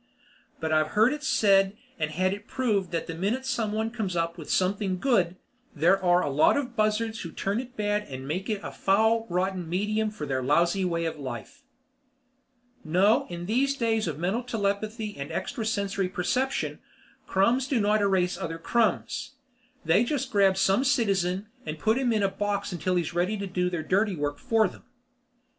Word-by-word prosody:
But 160 Hz, 0 st, -2 dB
I've 155 Hz, +4 st, +1 dB
heard 225 Hz, +5 st, +5 dB
it 300 Hz, 0 st, -6 dB
said 200 Hz, -6 st, +3 dB, 0.2 s
and 155 Hz, -1 st, 0 dB
had 185 Hz, +5 st, 0 dB
it 205 Hz, +3 st, -9 dB
proved 210 Hz, -8 st, 0 dB
that 170 Hz, -1 st, -2 dB
the 165 Hz, -, -5 dB
minute 205 Hz, +10 st, -1 dB
someone 225 Hz, -4 st, -1 dB
comes 210 Hz, -6 st, -3 dB
up 170 Hz, 0 st, -1 dB
with 160 Hz, -4 st, -10 dB
something 190 Hz, 0 st, +1 dB
good, 185 Hz, -7 st, +2 dB, 0.4 s
there 180 Hz, +6 st, +3 dB
are 175 Hz, 0 st, +4 dB
a -, -, -1 dB
lot 150 Hz, -, +4 dB
of 255 Hz, -4 st, -3 dB
buzzards 220 Hz, +1 st, 0 dB
who 170 Hz, -, -6 dB
turn 200 Hz, +6 st, -2 dB
it 250 Hz, 0 st, -8 dB
bad 210 Hz, 0 st, 0 dB
and 130 Hz, 0 st, -7 dB
make 185 Hz, +8 st, -3 dB
it 210 Hz, -2 st, -1 dB
a -, -, -5 dB
foul, 220 Hz, +3 st, +2 dB
rotten 180 Hz, -1 st, -1 dB
medium 210 Hz, +4 st, 0 dB
for 210 Hz, -8 st, -6 dB
their 130 Hz, -2 st, -1 dB
lousy 170 Hz, +8 st, +2 dB
way 170 Hz, -2 st, -1 dB
of 160 Hz, -2 st, -3 dB
life. 130 Hz, -, -7 dB, 1.2 s
No, 185 Hz, +7 st, +3 dB
in 175 Hz, 0 st, -6 dB
these 265 Hz, +7 st, +1 dB
days 225 Hz, -5 st, 0 dB
of 150 Hz, -4 st, -3 dB
mental 185 Hz, +9 st, -1 dB
telepathy 215 Hz, -1 st, -2 dB
and 140 Hz, 0 st, -6 dB
extra 215 Hz, +4 st, -3 dB
sensory 200 Hz, -3 st, -1 dB
perception, 255 Hz, +9 st, -1 dB, 0.5 s
crumbs 235 Hz, +7 st, +2 dB
do 260 Hz, -3 st, +1 dB
not 210 Hz, 0 st, +2 dB
erase 185 Hz, -3 st, +1 dB
other 165 Hz, -3 st, -4 dB
crumbs. 235 Hz, +8 st, 0 dB, 0.5 s
They 170 Hz, +8 st, +4 dB
just 265 Hz, +1 st, -2 dB
grab 195 Hz, -2 st, +4 dB
some 195 Hz, +5 st, +3 dB
citizen 195 Hz, -8 st, +1 dB, 0.2 s
and 155 Hz, -, -5 dB
put 220 Hz, -, +1 dB
him 255 Hz, -3 st, +1 dB
in 215 Hz, -2 st, +1 dB
a -, -, +4 dB
box 200 Hz, 0 st, -2 dB
until 180 Hz, +1 st, -1 dB
he 175 Hz, -, +2 dB
is 165 Hz, -, -6 dB
ready 180 Hz, +5 st, 0 dB
to 200 Hz, -, -4 dB
do 180 Hz, -1 st, -1 dB
their 175 Hz, -3 st, -3 dB
dirty 200 Hz, +2 st, +1 dB
work 145 Hz, -1 st, -3 dB
for 225 Hz, -2 st, +2 dB
them. -, -, -13 dB
195 Hz, 190 wpm, -27 LUFS, 175-220 Hz, 1.2 s, heard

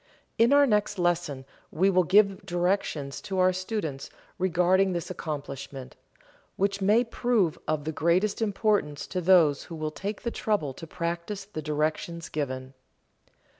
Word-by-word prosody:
In 230 Hz, +3 st, +5 dB
our 285 Hz, 0 st, +6 dB
next 210 Hz, -3 st, +1 dB
lesson 175 Hz, -6 st, 0 dB, 0.2 s
we 190 Hz, +4 st, +2 dB
will 185 Hz, -1 st, +4 dB
give 195 Hz, +1 st, +4 dB
directions 175 Hz, -6 st, -1 dB
to 190 Hz, -, -4 dB
our 185 Hz, 0 st, +4 dB
students 185 Hz, -7 st, -4 dB, 0.3 s
regarding 185 Hz, +1 st, +3 dB
this 170 Hz, 0 st, -4 dB
accomplishment, 140 Hz, -5 st, -6 dB, 0.6 s
which 200 Hz, +1 st, 0 dB
may 210 Hz, +5 st, +4 dB
prove 230 Hz, -7 st, 0 dB
of 155 Hz, -1 st, 0 dB
the 160 Hz, -, -3 dB
greatest 175 Hz, +8 st, +1 dB
importance 205 Hz, -8 st, 0 dB
to 180 Hz, -, -3 dB
those 165 Hz, -5 st, +4 dB
who 170 Hz, -, -8 dB
will 155 Hz, -1 st, -3 dB
take 200 Hz, +6 st, -5 dB
the 235 Hz, -, -2 dB
trouble 200 Hz, -14 st, -1 dB
to 165 Hz, -, -10 dB
practice 170 Hz, +5 st, -4 dB
the 195 Hz, -6 st, -6 dB
directions 155 Hz, +3 st, -2 dB
given. 130 Hz, -3 st, -4 dB
180 Hz, 145 wpm, -27 LUFS, 155-200 Hz, 0.6 s, our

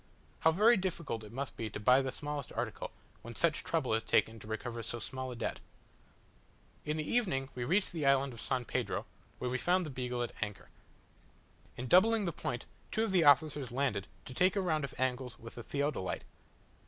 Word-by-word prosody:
How 160 Hz, -, +5 dB
very 215 Hz, +8 st, +6 dB
difficult 170 Hz, -, -2 dB
it 105 Hz, -, -10 dB
must 135 Hz, +3 st, -4 dB
be 115 Hz, -1 st, -3 dB
to 100 Hz, -, -6 dB
buy 125 Hz, +5 st, +6 dB
the 130 Hz, -1 st, -2 dB
smallest 145 Hz, 0 st, -4 dB
article, -, -, -3 dB, 0.3 s
when 120 Hz, 0 st, -9 dB
such 165 Hz, +3 st, +2 dB
trouble 150 Hz, -9 st, 0 dB
is 110 Hz, -, +2 dB
taken 110 Hz, 0 st, +2 dB
to 105 Hz, -, -11 dB
recover 115 Hz, +2 st, -4 dB
so 115 Hz, +1 st, -3 dB
small 130 Hz, +3 st, -5 dB
a -, -, -6 dB
debt. -, -, -3 dB, 1.3 s
In 150 Hz, +1 st, -1 dB
the 155 Hz, -, -2 dB
evening 180 Hz, -, +1 dB
we 120 Hz, -1 st, -3 dB
reached 190 Hz, +9 st, +2 dB
the 155 Hz, -5 st, -1 dB
island 135 Hz, -1 st, +4 dB
of 115 Hz, -, -8 dB
San 130 Hz, -2 st, -1 dB
Pedro, -, -, -1 dB, 0.3 s
where 125 Hz, -, -2 dB
we 130 Hz, -, 0 dB
found 180 Hz, +3 st, +2 dB
the 150 Hz, -, -5 dB
Beagle 125 Hz, -2 st, -2 dB
at 120 Hz, -, -3 dB
anchor. 105 Hz, -2 st, -4 dB, 1.1 s
In 125 Hz, -, -4 dB
doubling 210 Hz, -, +5 dB
the 170 Hz, -, 0 dB
point, 120 Hz, -4 st, -3 dB, 0.3 s
two 220 Hz, -, +1 dB
of 225 Hz, -, 0 dB
the 180 Hz, -4 st, +4 dB
officers 145 Hz, -2 st, +4 dB
landed 120 Hz, -7 st, 0 dB, 0.2 s
to 130 Hz, -, -7 dB
take 185 Hz, +7 st, +3 dB
a 200 Hz, -, +2 dB
round 160 Hz, -5 st, +1 dB
of 140 Hz, -, -6 dB
angles 130 Hz, -1 st, -1 dB
with 115 Hz, 0 st, -10 dB
the 120 Hz, -, -7 dB
theodolite. 140 Hz, -6 st, -2 dB
135 Hz, 205 wpm, -33 LUFS, 120-160 Hz, 1.3 s, very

